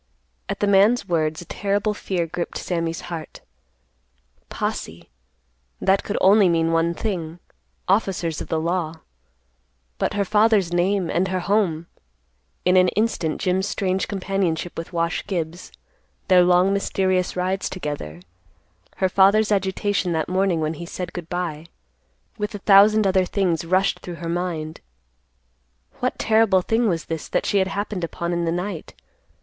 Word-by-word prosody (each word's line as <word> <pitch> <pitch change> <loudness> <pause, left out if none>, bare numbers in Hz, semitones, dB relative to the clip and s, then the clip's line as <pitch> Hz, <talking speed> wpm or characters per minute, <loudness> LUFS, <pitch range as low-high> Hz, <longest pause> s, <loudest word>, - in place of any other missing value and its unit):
At - - -4
the - - +3
man's 205 +5 +4
words 160 -1 0
a - - -18
terrible 205 +4 -1
fear 185 -4 -2
gripped 170 +1 -4
Sammy's 165 -2 -2
heart. 170 -3 -7 1.1
"Posse," - - -5 0.7
that 195 +1 +2
could 205 - -3
mean - - +4
only 190 -5 +5
one 165 +1 +1
thing,—officers 175 -1 -3
of - - -5
the 160 - -1
law. 165 -1 -2 1.0
But - - -1
her 200 -1 +1
father's 210 -3 +3
name 180 +1 +1
and 180 +3 +1
her 185 -1 -2
home—in 155 - -3
an 185 0 +6
instant 195 -6 -1
Jim's 190 +1 +1
strange 190 -2 -1
companionship 190 -4 -2
with 165 - -6
Wash 170 -1 -1
Gibbs, 175 -2 -4 0.6
their 185 -1 +7
long 180 +2 +4
mysterious 185 -2 0
rides 185 +1 -1
together, 145 - -6 0.7
her 190 - +1
father's 200 +3 +4
agitation 195 -2 0
that 160 -1 -1
morning, 185 -2 +1
when 155 +1 -1
he 170 +2 -7
said 180 +1 -6
good 175 -2 -7
by, 170 -3 -4 0.7
with 210 +1 -3
a 200 - -9
thousand 210 +1 +6
other 190 -1 +3
things 180 -4 0
rushed 185 +3 +1
through 175 - -7
her 170 0 -7
mind. 165 -2 -3 1.2
What 250 - -1
terrible 220 -4 +3
thing 225 +2 +1
was 165 -3 -2
this 160 -2 -5
that - - -1
she 200 - +2
had 190 - +1
happened 200 -1 -3
upon 170 +1 -3
in 170 0 -1
the 165 - 0
night? 180 0 -4
180 Hz, 145 wpm, -22 LUFS, 165-195 Hz, 1.2 s, their